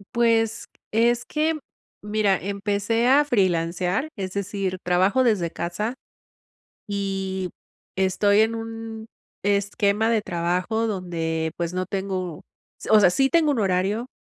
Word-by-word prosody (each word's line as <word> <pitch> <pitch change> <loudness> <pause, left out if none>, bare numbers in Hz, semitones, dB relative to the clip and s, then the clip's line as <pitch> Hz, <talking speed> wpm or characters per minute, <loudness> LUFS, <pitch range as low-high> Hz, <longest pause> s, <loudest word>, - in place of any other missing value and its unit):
Pues, 225 -2 +2 0.3
es 235 +2 +2
que, 310 +1 0 0.4
mira, 210 -2 +1
empecé 205 +4 0
a 285 +3 +5
freelancear, 185 - 0
es 190 -2 -5
decir, 195 -1 -2
trabajo 185 +8 +3
desde 200 -9 +1
casa, 210 +9 -3 0.9
y, 195 -2 -3 0.5
estoy 200 +2 +3
en 225 +1 +1
un 225 -1 -6 0.4
esquema 200 +1 +1
de 225 -2 +3
trabajo 180 +6 -1
donde, 165 -5 -2
pues, 170 0 -2
no 185 0 -1
tengo 190 -4 -3 0.5
o 215 - +7
sea, 185 - +6
sí 270 +9 +2
tengo 320 0 +3
un 280 - 0
horario, 195 +4 0
200 Hz, 125 wpm, -24 LUFS, 185-225 Hz, 0.9 s, o